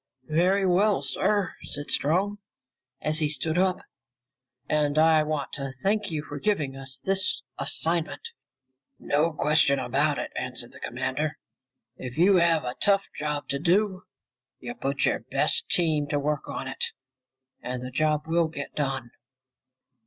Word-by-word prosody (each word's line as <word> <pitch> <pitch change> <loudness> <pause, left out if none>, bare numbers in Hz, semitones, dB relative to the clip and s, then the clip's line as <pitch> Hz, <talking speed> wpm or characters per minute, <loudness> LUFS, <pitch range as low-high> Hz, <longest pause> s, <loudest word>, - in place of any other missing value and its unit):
"Very 185 +5 +3
well, 190 -2 +3
sir," 195 +9 +1
said 145 0 -5
Strong 190 +8 +1 0.6
as 155 +1 +1
he 155 -2 +1
stood 155 +3 +1
up. 185 -1 +3 0.9
"And 150 -1 +1
I 160 0 +6
want 150 -2 -2
to 135 -2 -4
thank 210 +1 +1
you 155 -3 -3
for 145 -1 -7
giving 150 -8 0
us 135 -1 -7
this 190 +7 0 0.2
assignment." 170 - 0 0.7
"No 155 +3 +1
question 150 -2 +3
about 140 +3 +1
it," - - -4
answered - - -4
the - - -12
commander. - - -2 0.6
"If 125 +1 -7
you 185 +3 +6
have 170 -2 +3
a 125 0 -3
tough 200 -1 +3
job 150 -1 -3
to 140 - -1
do, 190 +4 +1 0.5
you 240 - -6
put 140 - -1
your - - +2
best - - 0
team 155 -4 +2
to 145 -1 0
work 145 0 -1
on 135 - -4
it, 130 - -4 0.8
and 125 0 -4
the 125 - -6
job 150 +2 +1
will 165 +1 +2
get 145 -3 -7
done!" 135 -4 -2
155 Hz, 150 wpm, -27 LUFS, 140-180 Hz, 0.9 s, I